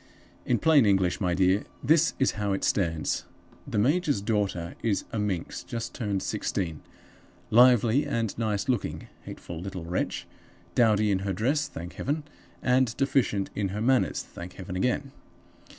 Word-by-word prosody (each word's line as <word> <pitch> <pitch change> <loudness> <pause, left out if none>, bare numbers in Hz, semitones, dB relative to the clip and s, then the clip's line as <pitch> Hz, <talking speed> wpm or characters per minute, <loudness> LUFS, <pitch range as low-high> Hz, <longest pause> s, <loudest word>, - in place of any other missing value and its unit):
"In 120 - +3
plain 150 -6 +5
English, 95 -2 +2
my 90 -2 +1
dear, 95 +2 +3 0.2
this 160 +5 +4
is 135 - +2
how 100 -1 -1
it 95 - -2
stands. 80 -5 0 0.4
The - - -3
major's 145 - +2
daughter 100 -5 -1
is 105 -4 0
a 110 - -2
minx 95 -3 -2
just 115 +6 -5
turned 100 -5 -2
sixteen; 80 -6 -2 0.7
lively 125 +3 +5
and 115 -7 -1
nice 110 -2 -1
looking 125 -2 -2 0.2
(hateful 85 -1 -7
little 95 -2 -6
wretch!), 90 +2 -2 0.5
dowdy 110 -3 +3
in 95 - +2
her 95 0 -2
dress 135 - +1
(thank 85 +2 -8
Heaven!) 150 +2 -2 0.4
and 125 -2 +2
deficient 125 -8 +1
in 100 -1 -1
her 100 +3 -4
manners 130 +2 +2
(thank 90 +1 -10
Heaven 90 0 -7
again!). 125 +7 0
105 Hz, 150 wpm, -27 LUFS, 95-125 Hz, 0.7 s, plain